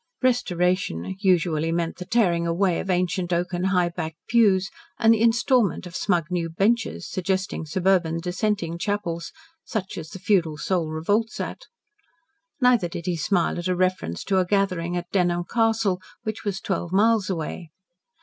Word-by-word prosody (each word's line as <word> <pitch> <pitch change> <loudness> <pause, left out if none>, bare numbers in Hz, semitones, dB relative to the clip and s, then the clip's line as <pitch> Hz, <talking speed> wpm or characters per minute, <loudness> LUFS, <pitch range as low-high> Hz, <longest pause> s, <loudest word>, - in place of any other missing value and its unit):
"Restoration" 180 - 0
usually 170 -5 +2
meant 170 0 -1
the 180 - -7
tearing 180 -6 +2
away 175 +1 +1
of 195 - -5
ancient 180 0 0
oaken, 175 +1 -1
high 180 -2 +2
backed 160 -2 -5
pews, 200 -5 +3 0.3
and 225 0 +5
the 220 - 0
instalment 230 - +2
of 175 -1 -9
smug 175 -3 +1
new 170 -2 -1
benches, 210 +7 0
suggesting 185 -3 -2
suburban 180 -1 +1
Dissenting 180 -1 -2
chapels, 175 -4 -2 0.3
such 195 -6 -4
as 160 -1 -8
the 190 - -8
feudal 180 -5 +1
soul 170 0 -1
revolts 205 +9 0
at. - - -5 0.9
Neither 250 -7 +4
did 170 0 -7
he 180 - 0
smile 175 +1 0
at 175 - -3
a 185 - +1
reference 180 - -1
to 195 - +1
the 185 - +4
gathering 180 -3 0
at 175 0 -6
Dunholm 175 -2 +1
Castle, 225 -4 +1 0.2
which 220 -1 -4
was 200 -3 -3
twelve 175 -3 -2
miles 210 0 +3
away. 165 -1 -4
185 Hz, 160 wpm, -24 LUFS, 170-205 Hz, 0.9 s, and